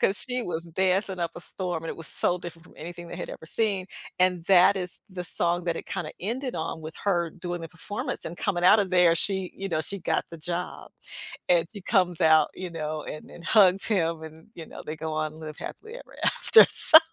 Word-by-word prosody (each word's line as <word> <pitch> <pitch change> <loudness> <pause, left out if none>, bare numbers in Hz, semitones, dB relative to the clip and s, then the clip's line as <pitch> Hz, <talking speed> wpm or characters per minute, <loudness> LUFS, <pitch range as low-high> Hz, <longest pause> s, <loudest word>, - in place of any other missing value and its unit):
'cause 195 - +2
she 250 -1 -2
was 165 -5 -4
dancing 185 +2 0
up 170 - -1
a - - -7
storm, 175 -2 -4
and - - -4
it - - -7
was 165 -1 -5
so 180 - +2
different 170 -2 -10
from - - -19
anything 175 +2 -8
they - - -7
had - - -6
ever - - -10
seen, 200 -2 -1 0.3
and 180 -2 +2
that 195 +1 +6
is 180 -1 -3
the 185 -2 -6
song 175 0 0
that 170 -2 -1
it - - -7
kinda 155 -3 -4
ended 245 +7 -3
on 160 0 -4
with 155 0 -8
her 175 -4 +1
doing 175 0 -5
the 165 - -7
performance 210 - -5
and 170 - -6
coming 175 -2 -1
out 210 +4 +7
of 195 -2 -2
there, 180 -2 +5
she, 190 +1 +2
you 195 0 -5
know 155 -3 -1
she 200 +6 -4
got - - 0
the 165 - -9
job, 175 +2 -5 0.6
and 170 -2 +4
she 205 - -9
comes 185 -5 +1
out, 160 -2 +5
you 185 -2 -6
know, 155 -2 -4
and 150 - -8
and 170 - -13
hugs 195 -3 +4
him 165 -6 0
and, 160 +2 -12
you 165 - -9
know, - - -10
they 155 - -4
go 160 0 -5
on 155 0 -3
live 155 -1 -8
happily 445 +1 -9
ever - - -12
after, 445 - +6
so, 315 - +9
175 Hz, 230 wpm, -26 LUFS, 165-190 Hz, 0.6 s, so